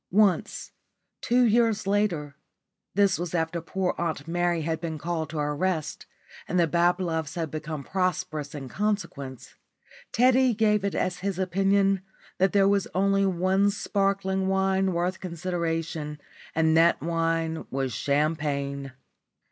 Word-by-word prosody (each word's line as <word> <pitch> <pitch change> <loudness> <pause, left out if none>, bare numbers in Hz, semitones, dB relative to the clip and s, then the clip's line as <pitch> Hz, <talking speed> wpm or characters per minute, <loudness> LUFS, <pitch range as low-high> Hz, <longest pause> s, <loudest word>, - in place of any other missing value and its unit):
Once, 200 -1 +1 0.5
two 250 +1 +3
years 230 -2 +3
later 185 -8 0 0.6
this 200 -4 +3
was 175 0 -3
after 165 0 -1
poor 185 +2 -1
Aunt 160 -3 -2
Mary 175 -1 0
had 160 0 -2
been 160 -2 -3
called 160 -1 -3
to 160 - -6
her 150 0 -1
rest 160 -2 -2 0.4
and 180 - 0
the 170 - +5
Babloves 170 -1 0
had 165 -4 -3
become 155 -1 -5
prosperous 180 -5 -2
in 135 -2 -6
consequence 170 - -3 0.6
Teddy 255 0 +4
gave 210 -1 +2
it 200 - -1
as 180 -1 -1
his 195 -1 -2
opinion 195 +1 +2 0.4
that 190 +1 +3
there 195 -1 +4
was 200 -1 +2
only 195 +1 +3
one 190 +2 +2
sparkling 195 -2 0
wine 190 0 +2
worth 175 +2 -1
consideration 165 -4 -3 0.4
and 160 0 +3
that 165 +1 +5
wine 165 -1 -1
was 135 -2 -2
champagne. 140 0 -1
175 Hz, 135 wpm, -26 LUFS, 160-195 Hz, 0.6 s, the